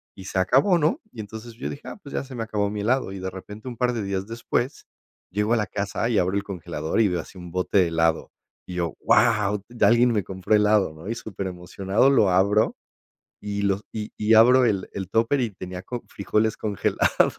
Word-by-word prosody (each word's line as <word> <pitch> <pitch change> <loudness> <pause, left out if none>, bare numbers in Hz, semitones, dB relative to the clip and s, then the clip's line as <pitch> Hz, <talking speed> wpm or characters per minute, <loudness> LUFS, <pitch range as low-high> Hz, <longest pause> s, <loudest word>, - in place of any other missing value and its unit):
y 95 - -11
se 95 - -1
acabó, 135 - +4
¿no?, 165 - +1
y 110 - -6
entonces, 110 +3 -9
yo 115 - -5
dije: 140 - -9
"Ah, - - -7
pues, 140 - -10
ya - - -1
se 130 -1 -10
me 115 - -2
acabó 105 -2 -1
mi 105 0 -4
helado", 125 -2 +1
y 95 - -6
de 95 - -3
repente 105 +5 -10
un 120 - -8
par 125 0 +1
de 115 -3 -2
días 95 0 -3
después 120 +4 -2 0.4
llego 105 +4 0
a 120 - +3
la 105 - -1
casa 105 +3 -2
y 115 - +1
abro 95 +2 +1
el 100 - 0
congelador, 85 -2 -3
y 110 - +5
veo 90 -2 -1
así, 95 - -14
un 90 -1 -9
bote 90 0 +2
helado, 80 -1 +1 0.4
y 90 - -6
yo, 85 -4 -1
guau, 105 -1 +3
ya 120 - +2
alguien 120 +1 +5
me 105 -4 +1
compró 95 +2 -2
helado, 105 -5 +3
¿no?, 80 +5 -11
y 115 - -1
superemocionado 95 +3 -1
lo 110 -8 +4
abro, 100 +4 +3 0.7
y 100 0 -3
lo 100 0 +1
y 105 -1 -5
y 110 +1 +2
abro 125 +3 +7
el 100 -5 0
el 95 -1 -5
Tupper, 115 +6 +2
y 115 -3 -1
tenía 90 -1 -7
co 120 +4 -6
frijoles 105 +2 0
congelados. 105 -2 +1
105 Hz, 220 wpm, -24 LUFS, 95-115 Hz, 0.7 s, abro